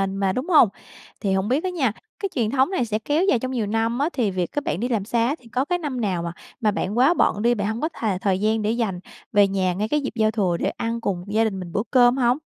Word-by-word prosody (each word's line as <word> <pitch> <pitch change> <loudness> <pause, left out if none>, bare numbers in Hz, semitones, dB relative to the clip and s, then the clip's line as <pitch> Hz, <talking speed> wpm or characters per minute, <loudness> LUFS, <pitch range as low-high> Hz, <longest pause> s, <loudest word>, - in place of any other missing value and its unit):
mà 195 0 0
mà, 190 - +1
đúng 265 +8 -3
hông? 295 - +6 0.5
Thì 195 - 0
hổng 190 +2 0
biết 265 +6 +1
á 370 - 0
nha, 285 -10 0 0.3
cái 395 - -2
truyền 225 -4 +1
thống 265 +4 +3
này 255 -11 0
sẽ 215 -1 -2
kéo 295 +9 0
dài 250 - +3
trong 255 +2 -4
nhiều 240 -5 -1
năm 225 +3 0
á, 300 +4 +1
thì 225 -7 0
việc 180 -2 -2
các 290 - -2
bạn 175 - -2
đi 245 - -1
làm 220 -5 0
xa 230 +1 +1
á, 285 - 0
thì 240 - -18
có 255 +2 0
cái 355 +3 0
năm 285 -7 -4
nào 185 -5 -1
mà 170 - -3 0.3
mà 210 -2 +3
bạn 205 +2 -2
quá 270 +7 +5
bận 210 -10 +1
đi, 240 +2 +3
bạn 205 -2 -1
hông 220 +4 -3
có 315 - 0
thà 210 -5 -1
thời 190 0 0
gian 215 +1 +1
để 210 +1 0
dành 220 -7 -1 0.3
về 205 -1 +6
nhà 190 -2 0
ngay 210 +4 -2
cái 300 +3 +1
dịp 270 - -4
giao 220 -1 +2
thừa 185 -6 0
để - - 0
ăn 230 0 -3
cùng 180 -5 -2
gia 215 +2 +2
đình 200 -4 -1
mình 175 -2 -7
bữa 205 - -1
cơm 245 -1 +5
hông? 245 0 +3
225 Hz, 300 wpm, -23 LUFS, 200-255 Hz, 0.5 s, hông